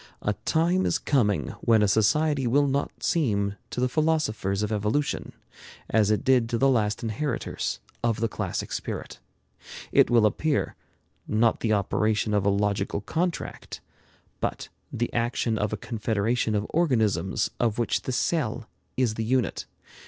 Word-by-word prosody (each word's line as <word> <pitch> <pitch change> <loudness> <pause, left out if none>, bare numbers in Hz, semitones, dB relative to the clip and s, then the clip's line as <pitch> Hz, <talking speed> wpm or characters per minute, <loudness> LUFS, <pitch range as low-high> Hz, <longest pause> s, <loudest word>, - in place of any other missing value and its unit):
A 105 - +1
time 175 +4 +2
is - - +1
coming 105 - +1
when 110 -2 +4
a - - +4
society 135 +7 +2
will 145 +4 +3
not 140 +1 -2
seem 105 - +1 0.2
to - - -5
the 125 - +2
philosophers 125 -10 0
of 105 - -2
evolution 105 +8 -1 0.6
as 105 -2 +3
it 105 - +1
did 125 -3 +3
to 115 - 0
the 135 +3 +3
last 110 -5 +1
inheritors 115 +4 -2 0.2
of 115 -2 +1
the 115 - +1
classic - - -4
spirit. - - -5 0.7
It - - +5
will 115 -2 +5
appear, 145 +7 0 0.5
not 110 +2 +2
the 110 -2 +1
operation 105 +1 +1
of 100 -1 +2
a - - +5
logical 100 0 0
contract, 165 - -3 0.6
but - - -3 0.2
the 120 - -2
action 115 -1 0
of 105 0 0
a 110 - -2
confederation 110 0 -1
of 105 0 0
organisms 110 - +1
of 115 -3 +1
which 120 - 0
the - - -4
cell 125 -5 -1 0.3
is 125 -4 +2
the 110 - -3
unit. 125 -1 0
115 Hz, 150 wpm, -26 LUFS, 105-130 Hz, 0.7 s, It